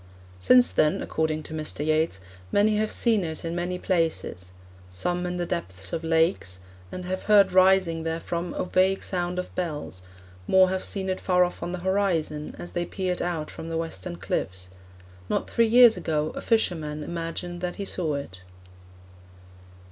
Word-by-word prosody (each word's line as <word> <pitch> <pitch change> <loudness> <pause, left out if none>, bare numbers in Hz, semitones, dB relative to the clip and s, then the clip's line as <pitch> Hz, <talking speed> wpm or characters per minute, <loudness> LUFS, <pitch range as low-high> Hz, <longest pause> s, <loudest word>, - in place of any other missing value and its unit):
Since 250 - +5
then, 155 -1 +2
according 155 -1 -1
to 155 - -8
Mr. 155 -1 -3
Yeats, 155 -9 +1 0.3
'many 210 +1 +3
have 215 0 0
seen 225 -5 +2
it 160 0 -4
in 165 +1 -3
many 175 +1 -2
places; 160 - -1 0.4
some 175 - -1
in 180 0 -3
the 175 - -1
depths 95 - -5
of 165 - -2
lakes, 160 - +1 0.3
and 180 - -6
have 185 +1 -3
heard 200 -2 +6
rising 185 -3 +4
therefrom 170 +1 -3
a - - -1
vague 185 +1 +2
sound 180 -1 -2
of 180 - -4
bells; 150 - -4 0.5
more 190 -1 +5
have 190 0 -2
seen 190 -2 -1
it 185 0 -1
far 180 -1 +3
off 180 - -3
on 175 - -3
the 180 -1 -5
horizon, 170 -6 0
as 175 - -8
they 175 - -1
peered 185 -2 -2
out 165 -3 -2
from 165 - -8
the 165 - -2
western 130 - -4
cliffs. 90 0 -3 0.6
Not - - 0
three 230 -1 +2
years 240 0 +7
ago 155 -1 -1
a - - -5
fisherman 160 -9 0
imagined 170 +2 -5
that 180 -1 -3
he 200 - -5
saw 165 -6 -1
it.' 95 -11 -7
175 Hz, 170 wpm, -26 LUFS, 155-185 Hz, 0.6 s, years